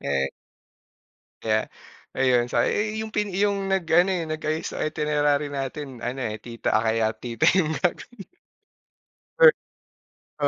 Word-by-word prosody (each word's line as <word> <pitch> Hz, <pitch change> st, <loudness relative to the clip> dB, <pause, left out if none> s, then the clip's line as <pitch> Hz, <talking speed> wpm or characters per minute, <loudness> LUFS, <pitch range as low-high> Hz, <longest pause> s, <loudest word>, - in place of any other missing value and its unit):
Eh 70 Hz, -1 st, -1 dB, 1.1 s
Kaya 110 Hz, -1 st, 0 dB, 0.4 s
ayun, 125 Hz, -2 st, +2 dB
sa -, -, +2 dB
"Eh, 215 Hz, +1 st, -1 dB
yung 220 Hz, -, -4 dB
pin 210 Hz, -2 st, -2 dB
yung 200 Hz, +1 st, +1 dB
nag-ano, 180 Hz, 0 st, +3 dB
eh, 175 Hz, -3 st, -1 dB
nag 155 Hz, 0 st, -4 dB
ayos 155 Hz, +1 st, -1 dB
sa -, -, -1 dB
itinerary 150 Hz, -1 st, 0 dB
natin 135 Hz, -2 st, -5 dB
ano 125 Hz, +3 st, -3 dB
eh, 110 Hz, -4 st, -3 dB
tita, 115 Hz, +2 st, -6 dB
ah, 110 Hz, -, +1 dB
kaya 110 Hz, 0 st, +1 dB
tita 115 Hz, -2 st, +1 dB
yung 160 Hz, -4 st, +2 dB
gagawin." 195 Hz, +4 st, -3 dB, 1.1 s
Perk -, -, +8 dB, 0.9 s
oo, -, -, +4 dB
150 Hz, 145 wpm, -24 LUFS, 120-185 Hz, 1.1 s, Perk